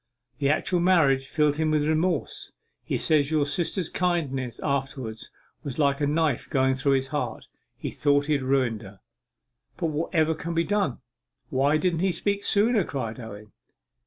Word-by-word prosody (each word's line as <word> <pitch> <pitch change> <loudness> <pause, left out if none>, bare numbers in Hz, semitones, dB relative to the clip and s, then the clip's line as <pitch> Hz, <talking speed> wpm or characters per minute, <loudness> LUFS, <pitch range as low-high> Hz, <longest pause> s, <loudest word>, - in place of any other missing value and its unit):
The 140 - +2
actual 175 +4 +1
marriage 155 -7 +3
filled 150 -1 +1
him 160 0 +1
with 150 -1 +1
remorse. 160 +3 -1 0.3
He - - -1
says 150 -2 +2
your 155 -2 +2
sister's 170 +4 -1
kindness 135 - -1
afterwards 135 -5 -3 0.3
was 140 -4 -5
like 140 -1 +2
a 145 - +2
knife 150 -3 0
going 130 0 +2
through 135 +1 +1
his 135 0 0
heart. 130 -6 -3 0.3
He - - -5
thought 145 0 +2
he 155 - +1
had 140 - +1
ruined 130 -4 +1
her.' 100 -2 -12 0.8
'But 170 -3 -1
whatever 160 +1 +1
can 165 +2 -5
be 165 - +3
done? 195 - -1 0.5
Why 140 +3 +3
didn't 170 0 0
he 190 +1 +2
speak 200 +4 -2
sooner?' 215 0 +3
cried 125 -7 -4
Owen. 105 -3 -9
145 Hz, 165 wpm, -26 LUFS, 135-165 Hz, 0.8 s, marriage